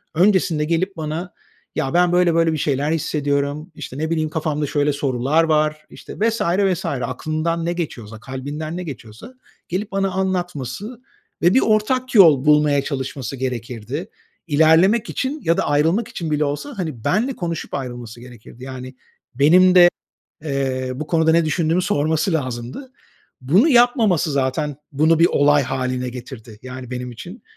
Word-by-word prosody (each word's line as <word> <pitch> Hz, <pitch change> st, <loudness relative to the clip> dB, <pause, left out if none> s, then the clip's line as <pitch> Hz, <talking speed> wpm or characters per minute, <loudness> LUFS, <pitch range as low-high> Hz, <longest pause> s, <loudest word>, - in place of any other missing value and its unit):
öncesinde 175 Hz, -4 st, +2 dB
gelip 170 Hz, +4 st, -1 dB
bana 160 Hz, +3 st, -4 dB, 0.4 s
“Ya, 135 Hz, -, -2 dB
ben 175 Hz, 0 st, +3 dB
böyle 175 Hz, -1 st, +3 dB
böyle 165 Hz, -1 st, +3 dB
bir -, -, -2 dB
şeyler 145 Hz, +1 st, 0 dB
hissediyorum," 145 Hz, 0 st, -1 dB
işte, 130 Hz, -, -8 dB
ne 160 Hz, +2 st, -2 dB
bileyim, 155 Hz, -2 st, 0 dB
"Kafamda 150 Hz, -1 st, -2 dB
şöyle 145 Hz, +1 st, +1 dB
sorular 140 Hz, +3 st, +1 dB
var,” 155 Hz, -1 st, +1 dB
işte, -, -, -11 dB
vs. 225 Hz, +1 st, +1 dB
vs. 185 Hz, 0 st, +1 dB
aklından 155 Hz, +5 st, -2 dB
ne 170 Hz, -, 0 dB
geçiyorsa, 120 Hz, -11 st, -6 dB
kalbinden 145 Hz, +6 st, -6 dB
ne 180 Hz, -, -4 dB
geçiyorsa 120 Hz, -, -10 dB, 0.4 s
gelip 195 Hz, +4 st, -3 dB
bana 195 Hz, 0 st, 0 dB
anlatması 185 Hz, -, -3 dB, 0.4 s
ve 175 Hz, +2 st, +4 dB
bir 265 Hz, -, +5 dB
ortak 250 Hz, +4 st, +1 dB
yol 155 Hz, -9 st, +7 dB
bulmaya 150 Hz, -1 st, +4 dB
çalışması 135 Hz, -1 st, -4 dB
gerekirdi. 125 Hz, -, -5 dB, 0.4 s
İlerlemek 165 Hz, +9 st, +4 dB
için 280 Hz, +3 st, -3 dB
ya 165 Hz, +1 st, +2 dB
da -, -, +1 dB
ayrılmak 160 Hz, +10 st, +1 dB
için 160 Hz, -3 st, -5 dB
bile 150 Hz, 0 st, +1 dB
olsa, 145 Hz, -, -4 dB
hani, 155 Hz, -, -5 dB
benimle 240 Hz, +7 st, +1 dB
konuşup 170 Hz, -3 st, -5 dB
ayrılması 120 Hz, -3 st, -6 dB
gerekirdi. 120 Hz, 0 st, -13 dB
Yani, 130 Hz, 0 st, -8 dB, 0.4 s
benim 180 Hz, +7 st, +5 dB
de, 175 Hz, -1 st, +8 dB, 0.6 s
eee, 135 Hz, -3 st, -2 dB
bu 150 Hz, +4 st, -5 dB
konuda 160 Hz, -1 st, +2 dB
ne 165 Hz, 0 st, +3 dB
düşündüğümü 165 Hz, +2 st, +1 dB
sorması 160 Hz, -1 st, 0 dB
lazımdı. 130 Hz, -, -4 dB, 0.5 s
Bunu 180 Hz, -, +4 dB
yapmaması, 235 Hz, -, +3 dB
zaten 140 Hz, +2 st, -1 dB, 0.2 s
bunu 155 Hz, +3 st, +3 dB
bir 165 Hz, -, +6 dB
olay 145 Hz, -2 st, +3 dB
hâline 130 Hz, -1 st, -2 dB
getirdi, 120 Hz, -3 st, -10 dB
yani, 130 Hz, -1 st, -8 dB
benim 125 Hz, 0 st, -5 dB
için. 180 Hz, -, -10 dB
155 Hz, 150 wpm, -20 LUFS, 135-180 Hz, 0.6 s, de